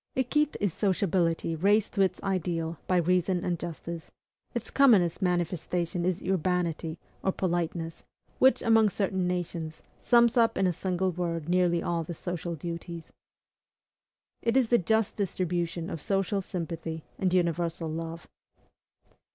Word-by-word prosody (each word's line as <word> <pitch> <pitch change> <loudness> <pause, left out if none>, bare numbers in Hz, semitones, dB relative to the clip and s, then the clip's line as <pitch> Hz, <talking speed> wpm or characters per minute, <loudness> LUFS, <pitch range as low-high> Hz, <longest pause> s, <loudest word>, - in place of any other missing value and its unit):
Equite 295 +4 +1
is 200 -5 0
sociability 175 -4 +1
raised 205 +5 +2
to 200 - +1
its 185 -2 +1
ideal 170 -4 -1
by 185 - +3
reason 180 +1 +1
and 175 -2 -1
justice; 170 0 -6 0.5
its - - -4
commonest 210 - +4
manifestation 175 -1 -1
is 185 -2 -1
URBANITY 175 -3 -1 0.3
or 190 - +2
POLITENESS, 170 -3 -2 0.4
which, 260 +1 +5
among 225 -2 +5
certain 190 -2 -1
nations, 170 -3 -3 0.2
sums 235 0 +4
up 230 -1 +4
in 195 - +2
a 180 - +2
single 185 +1 -1
word 165 -2 -3
nearly 175 -1 +2
all 170 -1 -1
the 170 +1 -6
social 175 0 -4
duties. 170 +1 -7 1.3
It 235 +2 +2
is 250 -4 +3
the 240 - +5
just 220 +3 +1
distribution 175 -3 -1
of 165 -6 -5
social 195 0 0
sympathy 165 -3 -5 0.2
and 185 -2 +1
universal 170 -2 0
love. 165 +1 -5
175 Hz, 135 wpm, -28 LUFS, 170-195 Hz, 1.3 s, which